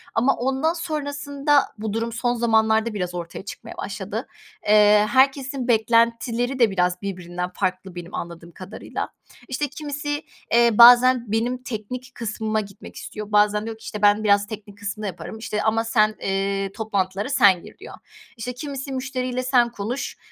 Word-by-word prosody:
Ama 250 +5 +3
ondan 270 +6 0
sonrasında 285 -3 0 0.2
bu 215 -1 -4
durum 230 +1 -2
son 240 +1 -1
zamanlarda 220 -1 +2
biraz 180 -3 -3
ortaya 175 +3 -6
çıkmaya - - -9
başladı. - - -5 0.4
Eee, 210 0 +6
herkesin 270 -1 +2
beklentileri 235 +2 +2
de 225 -4 +4
biraz 180 0 0
birbirinden 180 -2 -4
farklı 185 0 -3
benim 175 +2 -8
anladığım 170 0 -7
kadarıyla. 190 +5 -6 0.4
İşte, 275 +3 -2
kimisi, 290 +1 -4 0.3
eee, 235 0 +6
bazen 240 0 +7
benim 245 +3 -1
teknik 250 +2 -6
kısmıma 220 -1 -2
gitmek 200 -2 -12
istiyor. 210 0 -8
Bazen 210 +1 +3
diyor 225 -1 -6
ki, - - -18
işte, 210 - -6
"Ben 205 +1 +4
biraz 205 -1 +3
teknik 205 -2 -9
kısmı 210 +1 -5
yaparım." 180 +4 -7
İşte, 210 -1 -3
ama 225 +1 +2
"Sen, 215 -1 +2
eee, 195 0 -1
toplantılara 200 0 -2
sen 200 -10 +4
gir." - - -13
diyor. - - -11 0.4
İşte, 245 +3 -5
kimisi, 275 +1 -6
"Müşteriyle 255 -1 -3
sen 245 -2 +3
konuş, 235 +5 -4
220 Hz, 155 wpm, -23 LUFS, 205-255 Hz, 0.4 s, bazen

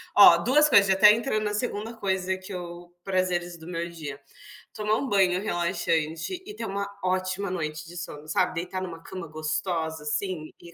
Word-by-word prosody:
ó, - - +10
2 300 +4 +4
coisas 200 -8 +6
já 190 - +4
até 210 +2 +8
entrou 230 -1 0
na 210 -1 -1
2º 225 0 -3
coisa 190 -1 0
que 185 +1 -11
eu 175 -1 -8
"prazeres 180 -2 -1
do 160 - -12
meu 170 -1 -3
dia": 150 -4 -7 0.5
tomar 215 0 0
um 275 - -2
banho 185 -2 +3
relaxante 170 - -1
e 420 - -9
ter 230 - -5
uma 200 0 -3 0.2
ótima 185 +1 -1
noite 155 -3 -3
de 175 +2 -10
sono, 155 -3 -7
sabe, 180 +3 +1
deitar 180 +2 -3
em 185 - -3
uma 165 -1 -9
cama 180 -3 -7
gostosa, 160 0 -2
assim, 155 +1 -2
e 170 -1 -13
180 Hz, 190 wpm, -26 LUFS, 165-200 Hz, 0.5 s, ó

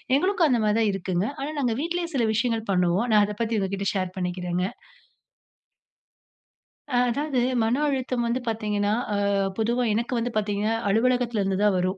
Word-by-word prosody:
எங்களுக்கும் 365 +2 +2
அந்த 240 -2 +2
மாரி 210 0 +2
தான் 220 -2 +3
இருக்குங்க. 185 -1 -1
ஆனா, 280 +2 -3
நாங்க 245 -4 +1
வீட்லேயே 340 +1 -2
சில 245 - +2
விஷயங்கள் 225 -1 -1
பண்ணுவோம். 180 +4 +2
நான் 210 -1 +6
அத 210 - -5
பத்தி 230 -1 0
உங்ககிட்ட 195 0 -2
ஷேர் 185 -1 -2
பண்ணிக்கிறங்க. 180 0 -2 2.3
ஆ. - - 0
அதாவது 280 +1 -1 0.2
மன 225 +2 +2
அழுத்தம் 255 -3 -1
வந்து 240 +2 0
பார்த்தீங்கன்னா, 210 -2 0 0.2
ஆ - - +1 0.4
பொதுவா 235 +3 +1
எனக்கு 235 +4 -1
வந்து 235 +1 -1
பார்த்தீங்கன்னா 210 +1 0
அலுவலகத்திலருந்து 225 -3 +1
தான் 210 - +4
வரும். 185 +1 -1
220 Hz, 155 wpm, -25 LUFS, 195-245 Hz, 2.3 s, நான்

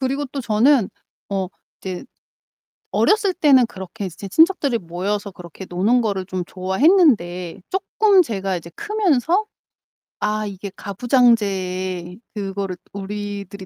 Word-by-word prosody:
그리고 270 +2 -1
또 275 +1 -5
저는 235 0 +3 0.4
어 190 -2 -2 0.3
이제 185 +4 -5 0.9
어렸을 420 -2 +3
때는 270 -7 +5
그렇게 195 -1 -7
이제 185 +3 -8
친척들이 310 - +3
모여서 195 +4 -3
그렇게 180 +1 -10
노는 205 +8 +2
거를 200 -5 -1
좀 185 -2 -3
좋아했는데 190 - +2
쪼끔 390 0 +3
제가 195 - -2
이제 170 0 -8
크면서 400 - +1 0.8
'아 215 0 0
이게 200 -1 -6
가부장제의 195 -5 +1
그거를 195 -2 -4 0.2
우리들이 200 -1 -6
205 Hz, 275 characters per minute, -21 LUFS, 185-260 Hz, 0.9 s, 때는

